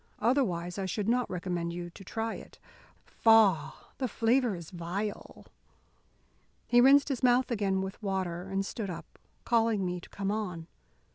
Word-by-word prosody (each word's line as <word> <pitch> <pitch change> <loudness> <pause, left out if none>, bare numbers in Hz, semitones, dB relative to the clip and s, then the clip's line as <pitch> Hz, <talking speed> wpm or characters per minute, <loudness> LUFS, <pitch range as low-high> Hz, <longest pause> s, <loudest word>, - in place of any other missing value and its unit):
Otherwise 200 -8 0
I 190 - -2
should 200 +2 -2
not 245 +1 +1
recommend 175 -2 -3
you 175 0 -6
to 195 - -12
try 225 +4 -3
it. - - -11 0.5
Faugh! 195 -12 +4 0.3
the 260 - 0
flavour 235 -1 +2
is 170 -3 -9
vile." 185 +4 -5 1.2
He 240 0 +5
rinsed 275 +3 +6
his 265 -4 -2
mouth 250 0 +3
again 195 -4 0
with 190 +3 -6
water, 190 -3 -3
and 195 0 -1
stood 205 -1 -4
up, 170 -2 -9 0.3
calling 225 -4 +2
me 180 0 -3
to - - -14
come 200 0 -3
on. 180 -6 -3
195 Hz, 155 wpm, -30 LUFS, 180-230 Hz, 1.2 s, rinsed